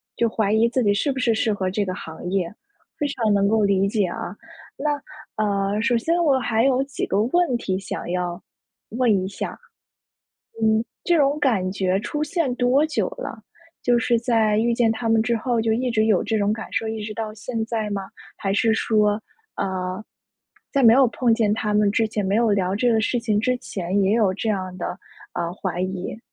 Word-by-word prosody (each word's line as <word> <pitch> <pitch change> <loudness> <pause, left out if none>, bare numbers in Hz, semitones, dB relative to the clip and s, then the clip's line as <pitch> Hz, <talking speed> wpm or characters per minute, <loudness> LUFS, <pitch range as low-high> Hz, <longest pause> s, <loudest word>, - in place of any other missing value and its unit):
就 235 -1 +1
怀 215 -2 0
疑 225 +2 +4
自 250 +1 0
己 205 -2 +3
是 250 +8 0
不 265 - -4
是 240 -2 +2
适 220 0 +1
合 190 -2 -1
这 205 +2 0
个 185 - -3
行 160 +2 -7
业， 190 -1 -1 0.4
非 290 - 0
常 225 -6 0
能 200 0 +3
够 220 +1 +2
理 195 -1 +3
解 210 -2 +1
啊。 175 +1 -5 0.4
那， 290 -1 -1 0.4
呃， 200 +1 0
首 240 0 +2
先 335 +9 +1
我 275 -4 +4
还 225 -2 +1
有 265 -1 +3
几 275 0 -4
个 200 - +1
问 260 -1 +2
题 190 -4 -2
想 195 - -6
要 175 -1 -2 0.5
问 225 -5 +2
一 - - -3
下， - - -4
嗯， - - -13 1.4
这 345 -2 +2
种 285 +1 +2
感 200 -10 +1
觉 190 -1 0
出 295 +7 -3
现 305 -6 -1
多 255 +5 +3
久 310 - -1
了？ - - -6 0.4
就 245 -1 +3
是 235 0 +2
在 225 -3 +2
遇 235 +2 +2
见 230 -1 +2
他 225 +1 -3
们 225 -1 +4
之 235 +1 +1
后 235 +1 0
就 225 0 +1
一 245 +2 0
直 220 -1 +2
有 210 -4 +3
这 220 +1 0
种 205 0 +1
感 220 - -8
受， 225 - -1
一 220 -1 -4
直 215 - -5
到 215 0 -5
现 225 +1 -4
在 220 -2 -2
吗？ 195 -1 -4 0.3
还 195 -2 -1
是 225 +2 +3
说， 215 -1 +2 0.4
呃， 185 +1 -3 0.7
在 275 -2 +2
没 230 -1 +8
有 265 0 +6
碰 235 0 +2
见 220 -3 +2
他 210 -1 -1
们 210 -1 +3
之 220 +2 +2
前， 210 -1 -2
没 195 +2 +1
有 230 -1 +3
聊 190 -2 +1
这 240 +4 +2
个 225 - +3
事 240 +2 0
情 215 -3 0
之 250 +4 +1
前 190 -5 -2
也 195 +2 +3
有 210 -5 +3
这 220 +3 -3
样 185 -3 -2
的， - - -3 0.5
呃， 170 0 -2
怀 180 -2 -4
疑？ 185 +3 -4
220 Hz, 230 characters per minute, -23 LUFS, 200-240 Hz, 1.4 s, 没